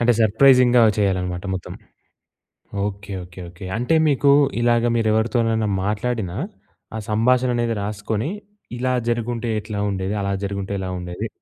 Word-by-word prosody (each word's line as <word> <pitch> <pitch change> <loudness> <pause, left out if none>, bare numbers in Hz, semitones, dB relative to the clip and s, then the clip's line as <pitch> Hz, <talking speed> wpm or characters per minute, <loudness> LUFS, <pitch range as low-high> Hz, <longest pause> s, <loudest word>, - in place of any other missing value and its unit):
అంటే 120 0 +4
సర్ప్రైజింగ్‌గా 125 +2 +5 0.2
చేయాలనమాట 90 -3 0
మొత్తం. 90 - -6 1.1
ఓకే. 100 0 -6
ఓకే. 90 +1 -12
ఓకే. 90 +2 -11
అంటే 125 +8 +1
మీకు 140 0 +3 0.3
ఇలాగ 120 0 +3
మీరెవరితోనైనా 110 0 +1 0.2
మాట్లాడిన, 105 -2 -2 0.6
ఆ - - -2
సంభాషణ 125 +4 +3
అనేది 120 -1 0
రాసుకొని, 105 - -3 0.5
ఇలా 130 +1 0
జరిగుంటే, 120 0 -1
ఎట్లా 105 -1 -5
ఉండేది? 95 +1 -2
అలా 100 0 -1
జరిగుంటే 100 0 -3
ఎలా 95 - -4
ఉండేది? 90 +5 -5
110 Hz, 125 wpm, -22 LUFS, 100-120 Hz, 1.1 s, సర్ప్రైజింగ్‌గా